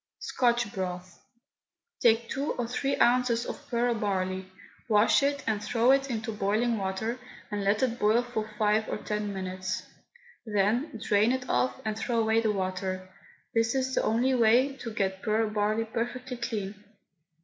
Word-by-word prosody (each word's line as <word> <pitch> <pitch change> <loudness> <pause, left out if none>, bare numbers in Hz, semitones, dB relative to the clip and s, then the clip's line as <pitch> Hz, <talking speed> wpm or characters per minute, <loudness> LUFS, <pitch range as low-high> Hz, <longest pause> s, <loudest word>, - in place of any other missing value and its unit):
SCOTCH 240 -4 0
BROTH. 180 -1 -5 0.8
Take 230 0 +4
two 280 +5 -2
or 240 - -3
three 275 +3 -1
ounces 240 -1 +3
of 290 - -7
pearl 240 0 +1
barley, 190 -3 -2 0.4
wash 210 +4 +5
it, 280 +1 0
and 210 -2 -1
threw 240 +2 +3
it 275 0 +3
into 225 -1 -3
boiling 215 +3 0
water, 200 +6 -2 0.3
and 205 -1 -2
let 205 +4 +2
it 245 -2 0
boil 220 +3 +3
for 220 -3 -4
five 215 0 +2
or - - -2
ten 210 -1 -3
minutes. 185 -1 -4 0.6
Then 220 +5 0
drain 215 +1 +3
it 260 -1 -2
off 125 0 +1
and 215 -1 -1
threw 230 +2 -2
away 220 0 +3
the 220 -2 +1
water. 185 -1 -3 0.4
This 225 +1 +2
is 260 0 0
the - - +2
only 240 +4 +2
way 250 +3 +4
to 230 - -6
get 190 -2 -1
pearl 220 0 +1
barley 215 +1 0
perfectly 245 +3 -4
clean. 210 -4 -4
220 Hz, 160 wpm, -28 LUFS, 205-240 Hz, 0.8 s, wash